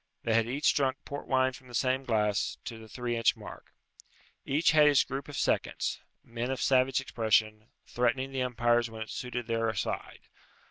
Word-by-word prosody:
They 115 Hz, -, 0 dB
had 115 Hz, 0 st, +3 dB
each 140 Hz, +4 st, +2 dB
drunk 135 Hz, -1 st, +1 dB
port 145 Hz, -, -6 dB
wine 130 Hz, 0 st, +2 dB
from 130 Hz, 0 st, -13 dB
the 120 Hz, -, -9 dB
same 130 Hz, +2 st, +1 dB
glass, 105 Hz, -3 st, 0 dB
to 115 Hz, -, -6 dB
the 110 Hz, -, -12 dB
three 120 Hz, 0 st, -3 dB
inch 115 Hz, -1 st, +3 dB
mark. -, -, -11 dB, 0.7 s
Each 150 Hz, +5 st, +2 dB
had 155 Hz, -2 st, +6 dB
his 145 Hz, -2 st, +5 dB
group 135 Hz, +1 st, -5 dB
of 145 Hz, -, -6 dB
seconds -, -, 0 dB, 0.2 s
men 115 Hz, +1 st, -4 dB
of 135 Hz, -, -2 dB
savage 130 Hz, 0 st, +3 dB
expression, 110 Hz, -3 st, 0 dB, 0.2 s
threatening 130 Hz, +2 st, 0 dB
the 135 Hz, -1 st, -2 dB
umpires 120 Hz, -1 st, +1 dB
when 110 Hz, 0 st, -6 dB
it 110 Hz, -, -11 dB
suited 125 Hz, -1 st, -4 dB
their 115 Hz, -1 st, 0 dB
side. -, -, -4 dB
125 Hz, 185 wpm, -29 LUFS, 115-135 Hz, 0.7 s, had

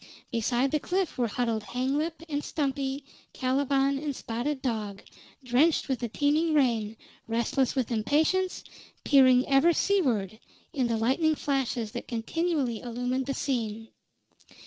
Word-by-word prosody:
Beside 240 Hz, +3 st, +1 dB
the 305 Hz, -, +1 dB
cliff 370 Hz, +3 st, -1 dB
were 245 Hz, -2 st, +1 dB
huddled 230 Hz, 0 st, -1 dB
Hanglip 275 Hz, -, -2 dB
and 295 Hz, -2 st, -2 dB
Stumpy, 275 Hz, -1 st, -2 dB, 0.3 s
Caliban, 275 Hz, +1 st, +1 dB
and 290 Hz, -2 st, -3 dB
Spotted 245 Hz, +6 st, -3 dB
Dog, 215 Hz, -6 st, -3 dB, 0.4 s
drenched 260 Hz, +6 st, +3 dB
with 265 Hz, -2 st, -1 dB
the 240 Hz, -, -2 dB
teeming 305 Hz, +6 st, +1 dB
rain, 225 Hz, -6 st, +1 dB, 0.3 s
restless 235 Hz, +3 st, 0 dB
with 255 Hz, -3 st, -1 dB
impatience, 310 Hz, +11 st, +1 dB, 0.4 s
peering 260 Hz, -2 st, +5 dB
ever 275 Hz, +5 st, +4 dB
to -, -, -4 dB
seaward 230 Hz, -, +1 dB, 0.3 s
in 260 Hz, -6 st, +1 dB
the 230 Hz, -1 st, 0 dB
lightning 275 Hz, +8 st, +2 dB
flashes 260 Hz, -7 st, -1 dB
that 240 Hz, -, -6 dB
continually 255 Hz, 0 st, -1 dB
illumined 245 Hz, +2 st, -2 dB
the 275 Hz, -, -2 dB
scene. 225 Hz, -5 st, -2 dB
260 Hz, 135 wpm, -28 LUFS, 235-290 Hz, 0.4 s, peering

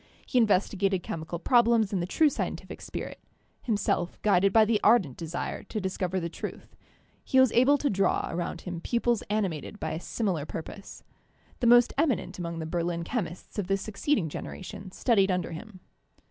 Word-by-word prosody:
He 255 Hz, -, +2 dB
investigated 195 Hz, -3 st, +2 dB
chemical 160 Hz, +1 st, -5 dB
problems 230 Hz, +1 st, +3 dB
in 190 Hz, -, +1 dB
the 175 Hz, -, -2 dB
true 310 Hz, +10 st, +4 dB
scien -, -, -2 dB
tific -, -, -10 dB
spirit; -, -, -6 dB, 0.4 s
himself 205 Hz, -6 st, -1 dB
guided 195 Hz, -2 st, +4 dB
by 220 Hz, +1 st, +6 dB
the 215 Hz, -1 st, +2 dB
ardent 205 Hz, -, +4 dB
desire 170 Hz, +1 st, -4 dB
to 215 Hz, -, -4 dB
discover 190 Hz, -1 st, -2 dB
the 170 Hz, -, -3 dB
truth, 170 Hz, -, -8 dB, 0.5 s
he 260 Hz, -, +3 dB
was 260 Hz, -3 st, +6 dB
able 260 Hz, +4 st, +5 dB
to 285 Hz, -, -1 dB
draw 195 Hz, -5 st, +1 dB
around 170 Hz, 0 st, -3 dB
him 175 Hz, -2 st, -6 dB
pupils 235 Hz, 0 st, +1 dB
animated 205 Hz, -3 st, -2 dB
by 160 Hz, -, -3 dB
a 160 Hz, -, -3 dB
similar 180 Hz, -6 st, -2 dB
purpose. 195 Hz, +5 st, -8 dB, 0.6 s
The 240 Hz, -, +2 dB
most 240 Hz, 0 st, +6 dB
eminent 285 Hz, -, 0 dB
among 170 Hz, -1 st, -4 dB
the 160 Hz, -, -4 dB
Berlin 170 Hz, +1 st, -2 dB
chemists 185 Hz, -2 st, -4 dB
of 190 Hz, -, -2 dB
the 195 Hz, 0 st, +2 dB
succeeding 210 Hz, -, -1 dB
generation 195 Hz, +5 st, -7 dB
studied 195 Hz, 0 st, +2 dB
under 180 Hz, -2 st, -1 dB
him. 185 Hz, +3 st, -9 dB
195 Hz, 175 wpm, -28 LUFS, 175-225 Hz, 0.6 s, by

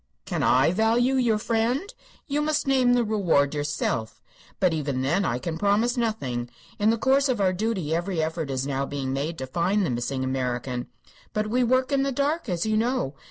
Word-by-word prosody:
"Can -, -, -2 dB
I 130 Hz, +5 st, +4 dB
value 225 Hz, +6 st, +2 dB
your 240 Hz, -5 st, +2 dB
friend? 235 Hz, -, -1 dB, 0.3 s
You 295 Hz, 0 st, -1 dB
must 305 Hz, 0 st, 0 dB
name 260 Hz, -3 st, +3 dB
the 245 Hz, -1 st, +3 dB
reward 180 Hz, -10 st, +2 dB
yourself. 145 Hz, -7 st, -2 dB, 0.4 s
But 185 Hz, -4 st, +3 dB
even 140 Hz, -4 st, -2 dB
then 145 Hz, +9 st, +1 dB
I 120 Hz, -, 0 dB
can 160 Hz, +5 st, -4 dB
promise 210 Hz, +5 st, +2 dB
nothing. 135 Hz, -, -2 dB, 0.3 s
In 210 Hz, +1 st, +3 dB
the 230 Hz, -, +2 dB
course 270 Hz, +3 st, +3 dB
of 245 Hz, -4 st, 0 dB
our 190 Hz, -2 st, +2 dB
duty 190 Hz, -6 st, -1 dB
every 175 Hz, +1 st, -1 dB
effort 160 Hz, -1 st, -2 dB
is 130 Hz, 0 st, -2 dB
now 140 Hz, 0 st, -2 dB
being 135 Hz, -2 st, -3 dB
made 150 Hz, +5 st, -2 dB
to 130 Hz, -, -4 dB
find 180 Hz, +9 st, 0 dB
the 155 Hz, -, -1 dB
missing 125 Hz, +2 st, -2 dB
American. 125 Hz, -1 st, -2 dB, 0.5 s
But 215 Hz, 0 st, -1 dB
we 250 Hz, +1 st, +2 dB
work 255 Hz, +2 st, +2 dB
in 275 Hz, -1 st, +2 dB
the 275 Hz, 0 st, 0 dB
dark, 285 Hz, +1 st, -1 dB
as 175 Hz, 0 st, -1 dB
you 215 Hz, 0 st, +1 dB
know. 235 Hz, -, 0 dB
195 Hz, 200 wpm, -25 LUFS, -, 0.5 s, I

